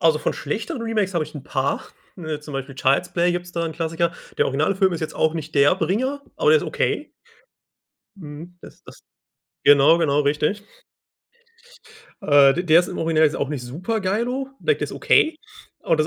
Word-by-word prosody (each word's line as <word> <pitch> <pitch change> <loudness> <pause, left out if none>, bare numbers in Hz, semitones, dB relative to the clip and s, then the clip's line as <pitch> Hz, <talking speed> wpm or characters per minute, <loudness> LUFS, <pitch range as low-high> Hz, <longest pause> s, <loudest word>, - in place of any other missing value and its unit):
Also 160 -2 +3
von - - -1
schlechteren 225 - -4
Remakes 210 -5 -1
habe 165 - +1
ich 155 +1 -14
'n 140 - -8
paar, 135 -2 -1 0.4
ne 155 -4 -5
zum 150 0 -10
Beispiel 135 0 -5
Child's 135 +6 +1
Play 175 0 +2
gibt's 175 0 -5
da 170 -1 -2
'n 160 - -4
Klassiker. 165 +1 -1 0.3
Der - - +3
Originalfilm 185 +7 +1
ist 165 - -4
jetzt 160 - -4
auch 160 +1 +1
nicht 160 -1 -6
der 140 +4 +5
Bringer, 260 +10 -1
aber 470 - +3
der 470 - +6
ist - - -5
okay. - - -2 1.1
Mhm, 165 +1 -11
das - - -15
das - - -14 0.6
genau, 145 +3 +6
genau 150 -3 +2
richtig. 150 +8 0 1.6
Äh, 140 -2 +5
d 175 - -1
der 170 0 +5
ist 180 - -5
im - - -6
Original 160 -1 +2
jetzt 150 - +1
auch 140 - -2
nicht 145 -4 -4
super 180 - -3
geilo, 240 +8 -2
like 450 - +1
der - - -1
ist - - -9
okay, 315 0 +2 0.5
aber 165 - +1
das 155 0 +1
165 Hz, 195 wpm, -22 LUFS, 150-190 Hz, 1.6 s, der